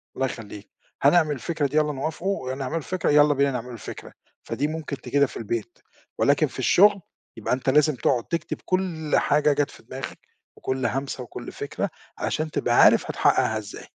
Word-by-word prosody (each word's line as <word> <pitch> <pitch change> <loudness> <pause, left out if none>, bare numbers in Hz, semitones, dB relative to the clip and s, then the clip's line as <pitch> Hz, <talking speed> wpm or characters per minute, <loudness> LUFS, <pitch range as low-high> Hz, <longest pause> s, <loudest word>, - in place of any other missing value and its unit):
الله 135 - 0
يخليك، 105 -4 -7 0.3
هنعمل 155 +2 +4
الفكرة 155 0 -1
دي 150 +3 -2
يالّا 150 -1 +3
نوافقوا 155 0 -3
ونعملوا 135 +4 -3
الفكرة 180 +3 -2
يالّا 145 0 +6
بينا 140 0 +2
نعملوا 125 -1 -5
الفكرة، 115 - -9 0.3
فدي 145 - -2
ممكن 155 -3 -5
تجدها 140 -1 +2
في - - -9
البيت، 115 +1 -4 0.4
ولكن - - +3
في - - -10
الشغل 200 +1 +5 0.4
يبقى - - -1
أنت 130 +1 -1
لازم 150 +1 +4
تقعد 120 0 +1
تكتب 170 -2 -3
كل 175 -5 -2
حاجة 150 0 +3
جَت 145 0 0
في - - -16
دماغك، - - -7 0.4
وكل 130 -2 -2
همسة 135 +2 -2
وكل 120 - -8
فِكرة، - - -4 0.3
عشان 155 0 -2
تبقى - - 0
عارف - - +6
هتحقَّقها 110 - +2
إزاي. 105 -2 -8
145 Hz, 170 wpm, -24 LUFS, 130-155 Hz, 0.4 s, يالّا